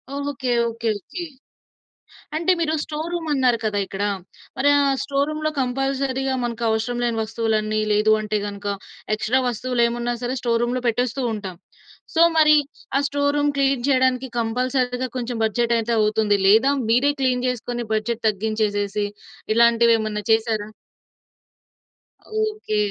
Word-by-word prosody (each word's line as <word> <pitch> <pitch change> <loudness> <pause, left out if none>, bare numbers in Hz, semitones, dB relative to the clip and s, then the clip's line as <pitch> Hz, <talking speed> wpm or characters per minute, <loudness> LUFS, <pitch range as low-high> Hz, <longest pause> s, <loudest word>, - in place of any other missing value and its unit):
Okay. 280 -3 -3 0.2
Okay. 230 0 -3
Okay. 355 - -7 1.1
అంటే 335 +3 +2
మీరు 315 -1 0
store 310 +2 -5
room 340 -2 -3
అన్నారు 255 -4 +3
కదా! 210 -1 -1
ఇక్కడ. 195 +1 -4 0.5
మరి 285 +2 +3
ఆహ్, 275 -1 +2
స్టోర్ 280 +1 0
రూమ్‌లో 310 0 -1
కంపల్సరీగా 270 +1 -1
మనకవసరం 230 0 -1
లేని 235 -2 0
వస్తువులన్నీ 215 -1 -1
లేదు 210 +1 +3
అంటే 215 0 -1
గనుక 205 0 -6 0.5
ఎక్స్ట్రా 235 +4 +1
వస్తువులేమున్నా 240 0 0
సరే 250 +2 -2
స్టోర్ 230 -1 +1
రూమ్‌లో 245 +1 -1
పెట్టేస్తూ 245 +3 0
ఉంటాం. 195 -5 -6 0.6
సో, 330 - +3 0.2
మరి 305 -1 +6 0.4
ఆ - - +3
స్టోర్ 285 +1 0
రూమ్ 290 0 +2
క్లీన్ 270 -2 +1
చేయడానికి 260 -1 +2
కంపల్సరీగా 250 +2 -1
కొంచెం 245 0 -3
బడ్జెటైతే 235 +1 +1
అవుతుంది. 210 -1 +2
లేదా 225 +7 +5 0.2
మీరే 250 +5 +4
క్లీన్ 255 -1 +1
చేసుకొని 240 -1 -3
బడ్జెట్ 220 +2 -2
తగ్గించేసేసి 205 -1 -1 0.5
ఇలాంటివేమన్నా 230 -2 +3
చేశారా? 220 -1 +1 1.8
ఓకే. 425 - -3
240 Hz, 125 wpm, -22 LUFS, 220-270 Hz, 1.8 s, మరి